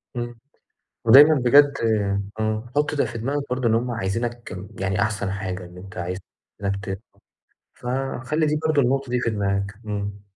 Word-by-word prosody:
إمم، 120 -1 -5 0.7
ودايمًا 145 +7 +9
بجد 140 +2 +6 0.7
إمم، 110 +1 0
حُط 150 0 +2
ده 145 - +2
في - - -5
دماغك 140 +5 -1
برضه 125 -1 +1
إن 110 - +3
هُم 120 +2 0
عايزينك 115 0 -3 0.2
يعني 95 +1 0
أحسن 105 -3 -1
حاجة، 95 -2 -4
إن 90 +1 -13
أنت 95 0 -11
عايزينك 100 +2 -5
ت 95 +1 -4 0.7
فخلّي 135 +4 -1
دي 150 0 +1
برضه 150 -3 +3
النقطة 135 +1 0
دي 125 0 +1
في 115 - 0
دماغك، 100 -1 -1
إمم. 100 -1 -4
115 Hz, 155 wpm, -23 LUFS, 100-130 Hz, 0.7 s, ودايمًا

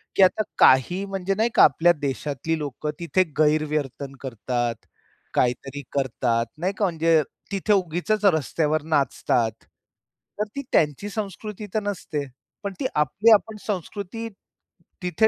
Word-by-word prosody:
की 195 - +6
आता 185 +3 +4 0.2
काही 155 +9 +5
म्हणजे 195 -1 -2
नाही 220 +4 +2
का - - +8
आपल्या 175 +1 +5
देशातली 145 +3 -2
लोकं 150 0 -4
तिथे 175 +2 +2 0.2
गैरवर्तन 150 -3 0
करतात, 120 -1 -2 0.6
काहीतरी 135 +3 0
करतात. 120 -4 0
नाही 180 +5 -1
का? 210 - +2
म्हणजे 165 -2 +3 0.3
तिथे 200 +2 +1
उगीचच 195 +3 0
रस्त्यावर 155 -3 +2
नाचतात. 135 -6 +1 0.9
तर 210 - +1
ती 280 - -2
त्यांची 150 +6 +2
संस्कृती 210 0 -5
तर 215 - +2
नसते. 180 -8 -3 0.4
पण 200 -1 -3
ती - - -2
आपली 190 +10 +3
आपण 215 +1 +2
संस्कृती 205 +3 -4 0.8
तिथे 180 +5 +3
165 Hz, 130 wpm, -24 LUFS, 140-200 Hz, 0.9 s, का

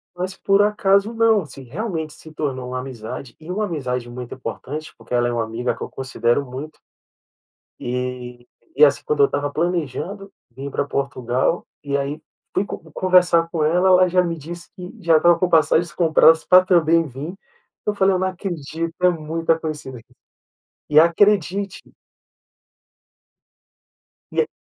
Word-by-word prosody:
mas 185 +2 -4
por 195 +1 +3
acaso 205 0 +2
não, 225 -2 +3
assim, 140 -3 -11
realmente 160 - -4
se 160 - -13
tornou 130 -5 -3
uma 130 0 -3
amizade. 125 -1 -7
E 160 +3 -8
uma 210 +3 -1
amizade 125 -9 -3
muito 125 0 -7
importante 150 +3 -6
porque 115 +1 -10
ela 120 0 +2
é 120 - -1
uma 115 -1 0
amiga 115 +2 -2
que - - -17
eu - - -6
considero 130 0 -1
muito, 140 +5 -8 1.0
e 125 0 -5 0.3
e 460 - +8
assim - - +2
quando 450 -2 -1
eu 420 - +7
estava 145 - -2
planejando 175 - -3 0.2
vim 140 +2 -6
pra - - -1
Portugal 135 +2 -1 0.2
e 140 -1 -1
aí 140 +3 -3 0.3
fui 195 - +1 0.3
conversar 180 -2 +4
com 160 -3 0
ela, 175 +4 +3
ela 185 0 +6
já 180 +1 +3
me 170 -1 -2
disse 170 +3 -9
que 180 -1 -8
já 170 -4 +4
estava 170 +1 +4
com 180 +1 +1
passagens 160 0 +3
compradas 160 -1 +4
pra 185 0 +6
também 165 -2 +3
vim, 145 +7 -7 0.5
eu 210 - +1
falei: 195 -1 +3
"Eu 185 - +1
não 185 0 0
acredito 165 -3 -5
é 180 - +6
muita 165 0 -1
coincidên" 150 -6 -6 0.9
e 150 +1 +7
acredite 195 +2 +2 2.5
e, 460 - +1
160 Hz, 155 wpm, -21 LUFS, 135-185 Hz, 2.5 s, e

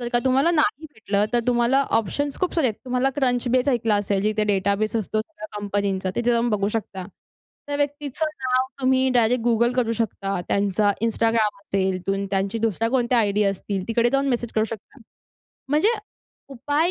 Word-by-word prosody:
जर 240 - -3
का 240 - +4
तुम्हाला 270 +6 +3
नाही 315 -1 +1
भेटलं 205 -2 0
तर 240 - +3
तुम्हाला 245 +2 +3 0.2
ऑप्शन्स 280 +7 -3
खूप 365 - 0
सारे 320 -6 +2
आहेत. 220 - 0
तुम्हाला 255 +1 +1
क्रंच 250 -3 0
बेस 255 +2 +2
ऐकलं 230 -5 +2
असेल 200 -1 0
जिथे 215 0 +1
डेटाबेस 200 +2 0
असतो 215 0 -1
सगळ्या 220 -3 -9
कंपनींचा. 200 -2 -1
तिथे 240 0 +1
जाऊन 235 0 +2
बघू 205 -1 +1
शकता. 195 -4 -4 0.6
त्या 285 - -2
व्यक्तीचं 290 +1 -2 0.2
नाव 255 0 +1
तुम्ही 260 0 +3
डायरेक्ट 235 0 +3
Google 235 +1 +3
करू 230 -3 +1
शकता. 200 -4 -2
त्यांचा 205 +1 +2
Instagram 225 -2 +1
असेल. 190 -2 -1
तुन 195 0 0
त्यांची 195 +3 -1
दुसऱ्या 225 0 0
कोणत्या 245 -1 +2
आयडी 210 -1 +2
असतील. 195 0 -2
तिकडे 235 +1 +2
जाऊन 275 0 +1
मेसेज 240 -2 -1
करू 215 0 +2
शकता. 225 +4 -9 0.7
म्हणजे 305 +9 +3 0.6
उपाय 290 +6 0
230 Hz, 175 wpm, -23 LUFS, 205-260 Hz, 0.7 s, का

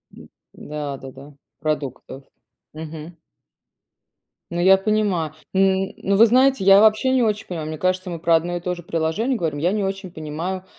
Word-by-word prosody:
М, - - -14 0.2
да-да-да. 140 -1 -8 0.3
Продуктов. 140 -3 -4 0.5
Мгм. 160 +1 -9 1.4
Ну, 170 - -3
я 190 +2 +6
понимаю, 195 -6 0 0.2
н 190 0 +2
ну, 200 0 0
вы 230 - +8
знаете, 255 -1 +3
я 195 +1 +7
вообще 220 +4 +4
не 260 -1 +3
очень 215 -2 0
понимаю, 160 -4 -5
мне 155 0 -5
кажется 185 +1 -1
мы 170 - -4
про 165 0 +3
одно 175 +2 -1
и - - -5
то 180 +1 -3
же 175 - -8
приложение 170 +10 -1
говорим. 155 -5 -2
Я 175 +4 +1
не 210 -1 -1
очень 195 -2 -4
понимаю, 170 +4 -5
180 Hz, 165 wpm, -21 LUFS, 155-195 Hz, 1.4 s, вы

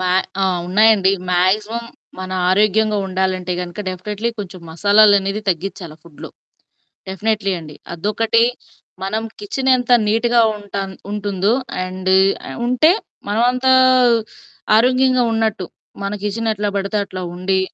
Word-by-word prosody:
మా 185 - -1 0.3
ఆ! - - +3 0.2
ఉన్నాయండి. 200 0 +4 0.2
మాక్సిమం 210 +6 +1 0.3
మన 185 0 -6 0.2
ఆరోగ్యంగా 210 +2 +2
ఉండాలంటే 185 -1 -2
గనుక 175 +3 -6
డెఫినెట్లీ 210 +5 -4
కొంచెం 185 -3 -7
మసాలాలనేవి 200 +2 +3
తగ్గిచ్చాల 180 -2 -3
ఫుడ్‌‌లో. 170 -4 -12 0.8
డెఫినెట్లీ 200 +1 -1
అండి. 150 -2 -11 0.2
అదొకటి 215 +6 +1 0.6
మనం 215 +3 -2 0.2
కిచెనెంత 255 +3 0 0.2
నీట్‌గా 235 +2 +2 0.2
ఉంటాన్ 200 -1 -6 0.2
ఉంటుందో 205 0 -1 0.3
అండు 185 +1 -1 0.3
ఆహ్, - - -7
ఉంటే 280 +7 +4 0.4
మనమంతా 250 +4 +2 1.1
ఆరోగ్యంగా 255 +1 +3
ఉన్నట్టు. 220 -4 -1 0.4
మన 200 +1 -3
కిచెన్ 225 +3 -2
ఎట్లా 205 0 -2
పడితే 200 +2 -2
అట్లా 185 -1 -7
ఉండి 190 +1 0
205 Hz, 110 wpm, -18 LUFS, 185-225 Hz, 1.1 s, ఉన్నాయండి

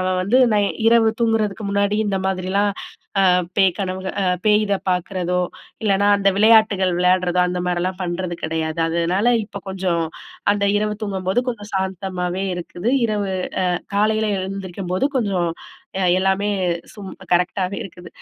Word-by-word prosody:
அவன் 185 0 0
வந்து 220 +7 +3 0.2
நான் 205 -1 +3 0.2
இரவு 230 -1 +5
தூங்குறதுக்கு 215 -2 0
முன்னாடி 200 +1 +1
இந்த 195 -1 0
மாதிரிலாம் 190 +2 0 0.6
அ - - +6 0.3
பேய் 190 -3 +4
கனவுகள் 190 0 -4
அ - - +1 0.2
பேய் 210 0 +5
இத 200 - +1 0.2
பாக்குறதோ! 180 0 -1 0.4
இல்லைனா 200 0 +3
அந்த 195 0 +4
விளையாட்டுகள் 210 -4 +4
விளையாட்றதோ! 180 0 +2
அந்த 180 0 -2
மாரிலாம் 180 +1 -1
பண்றது 175 0 -3
கெடையாது. 160 0 -2
அதனால, 170 +6 +1 0.2
இப்போ 200 - -9
கொஞ்சம் 180 -3 -1 0.5
அந்த 205 0 0
இரவு 210 0 0
தூங்கும்போது 195 0 -1
கொஞ்சம் 210 -4 -4
சாந்தமாவே 190 -1 -2
இருக்குது 175 +4 -4 0.2
இரவு 205 -3 -1 0.4
அ - - +1 0.2
காலையில 215 +1 +2
எழுந்திரிக்கும்போது 190 +1 -3
கொஞ்சம் 195 -7 0 0.7
எல்லாமே 190 +2 +1 0.5
சும் 200 -3 -8 0.2
கரெக்ட்டாக 180 +2 +1
இருக்குது. 175 -2 -11
190 Hz, 135 wpm, -21 LUFS, 180-205 Hz, 0.7 s, அ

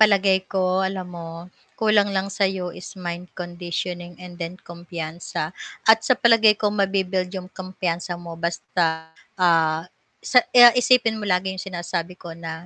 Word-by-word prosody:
Palagay 200 -3 +5
ko 190 -1 +1 0.3
alam 190 -2 -6
mo, 165 -1 -7 0.5
kulang 215 -2 +3
lang 190 +1 0
sa'yo 190 -2 0
is - - -9 0.2
mind 175 +1 -4
conditioning 175 0 -5
and 180 - -10
then 170 +1 -4
kumpiyansa, 170 -2 -6 0.5
at 220 - +7
sa 255 - +5
palagay 225 -2 +6
ko 210 - +1
mabi-build 190 -2 0
'yung 185 -2 -6
kumpiyansa 180 -1 -3
mo 170 - -7
basta, 170 0 0 0.6
ah, 160 -2 +3 0.5
sa 250 - +7 0.2
ah, 240 0 +10
isipin 230 -3 +3
mo - - -4
lagi 180 +1 +1
'yung 185 - -6
sinasabi 175 -1 -4
ko 170 - -8
na 165 - -4
180 Hz, 150 wpm, -23 LUFS, 175-195 Hz, 0.6 s, ah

